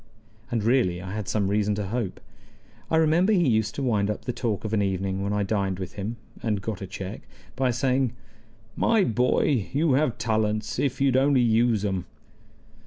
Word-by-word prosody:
And 115 Hz, -3 st, -1 dB
really 115 Hz, -7 st, +2 dB
I 95 Hz, +2 st, -6 dB
had 105 Hz, -2 st, -4 dB
some 100 Hz, 0 st, 0 dB
reason 105 Hz, +1 st, +1 dB
to 100 Hz, -2 st, -3 dB
hope. 115 Hz, -3 st, -3 dB, 0.7 s
I -, -, +2 dB
remember 165 Hz, +6 st, +4 dB
he 175 Hz, -6 st, +3 dB
used 110 Hz, -2 st, +1 dB
to 140 Hz, -, -3 dB
wind 105 Hz, -5 st, +1 dB
up 105 Hz, -, -4 dB
the 125 Hz, -, -2 dB
talk 115 Hz, -3 st, -2 dB
of 110 Hz, -, -3 dB
an 105 Hz, -, +2 dB
evening 95 Hz, 0 st, -1 dB
when 100 Hz, +1 st, -1 dB
I 105 Hz, 0 st, +1 dB
dined 100 Hz, -2 st, -1 dB
with 95 Hz, -1 st, -6 dB
him 110 Hz, +4 st, -5 dB, 0.2 s
(and 105 Hz, -3 st, 0 dB
got 105 Hz, -1 st, -5 dB
a 95 Hz, -, -5 dB
check) 95 Hz, 0 st, -6 dB, 0.3 s
by 130 Hz, 0 st, +1 dB
saying: 130 Hz, 0 st, +1 dB, 0.6 s
"My 225 Hz, -3 st, +3 dB
boy, 125 Hz, -, +1 dB
you 150 Hz, 0 st, +2 dB
have 135 Hz, -3 st, +1 dB
talents, 110 Hz, -1 st, -1 dB
if 135 Hz, -2 st, 0 dB
you'd 135 Hz, -2 st, +3 dB
only 135 Hz, -1 st, +4 dB
use 115 Hz, -2 st, +2 dB
'em." 95 Hz, -3 st, -2 dB
110 Hz, 190 wpm, -25 LUFS, 100-130 Hz, 0.7 s, remember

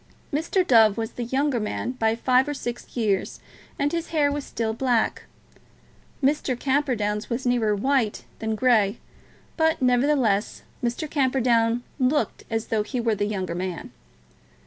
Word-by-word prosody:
Mr. 335 Hz, +5 st, +1 dB
Dove 225 Hz, -6 st, +5 dB
was 225 Hz, -1 st, -3 dB
the 240 Hz, -, -5 dB
younger 265 Hz, +1 st, 0 dB
man 215 Hz, +3 st, -3 dB
by 225 Hz, -3 st, 0 dB
five 255 Hz, +3 st, +3 dB
or 290 Hz, -, -2 dB
six 240 Hz, -1 st, -6 dB
years, 205 Hz, -5 st, 0 dB, 0.4 s
and 285 Hz, +1 st, 0 dB
his 335 Hz, -1 st, -2 dB
hair 295 Hz, -3 st, +2 dB
was 290 Hz, 0 st, -3 dB
still 225 Hz, -3 st, -3 dB
black. 240 Hz, -1 st, 0 dB, 1.0 s
Mr. 270 Hz, -3 st, +1 dB
Camperdown's 245 Hz, -7 st, 0 dB
was 245 Hz, +2 st, -3 dB
nearer 235 Hz, -4 st, +2 dB
white 250 Hz, 0 st, 0 dB, 0.2 s
than 220 Hz, 0 st, -2 dB
grey; 215 Hz, -4 st, +3 dB, 0.6 s
but, 320 Hz, 0 st, +2 dB
nevertheless, 250 Hz, -5 st, +2 dB, 0.2 s
Mr. 240 Hz, +6 st, -1 dB
Camperdown 245 Hz, -5 st, +2 dB, 0.2 s
looked 270 Hz, +3 st, 0 dB
as 225 Hz, -1 st, -2 dB
though 220 Hz, -2 st, +1 dB
he 250 Hz, +4 st, -3 dB
were 230 Hz, -1 st, +1 dB
the 205 Hz, 0 st, -1 dB
younger 190 Hz, -5 st, -3 dB
man. 180 Hz, 0 st, -5 dB
240 Hz, 145 wpm, -24 LUFS, 220-270 Hz, 1.0 s, Dove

